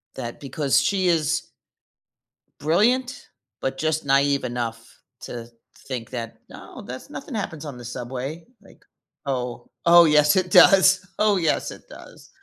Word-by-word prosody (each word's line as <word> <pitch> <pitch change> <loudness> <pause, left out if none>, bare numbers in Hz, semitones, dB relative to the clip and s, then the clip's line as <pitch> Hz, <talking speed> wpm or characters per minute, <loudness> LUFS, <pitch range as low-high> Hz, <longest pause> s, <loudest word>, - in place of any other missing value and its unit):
That 120 -3 -7
because 140 0 0
she 185 +5 0
is 160 -2 0 1.1
brilliant, 240 - +1 0.3
but 135 0 -3
just 155 0 -1
naive 140 0 +2
enough 120 -2 -4 0.4
to 115 -1 -7 0.4
think 120 -4 -5
that, 115 -3 -7
"No, - - -11
that's 130 - -9
nothing 280 -1 -8
happens 160 -7 -4
on 140 -4 -7
the 120 - -10
subway." 130 +6 -6 0.2
Like, - - -20 0.4
"Oh, 125 -3 -4
oh 170 0 +8
yes 150 0 +4
it 185 -1 0
does. 190 0 +6
Oh 210 -2 +3
yes, 165 -3 0
it - - -13
does." - - -14
145 Hz, 140 wpm, -23 LUFS, 125-175 Hz, 1.1 s, oh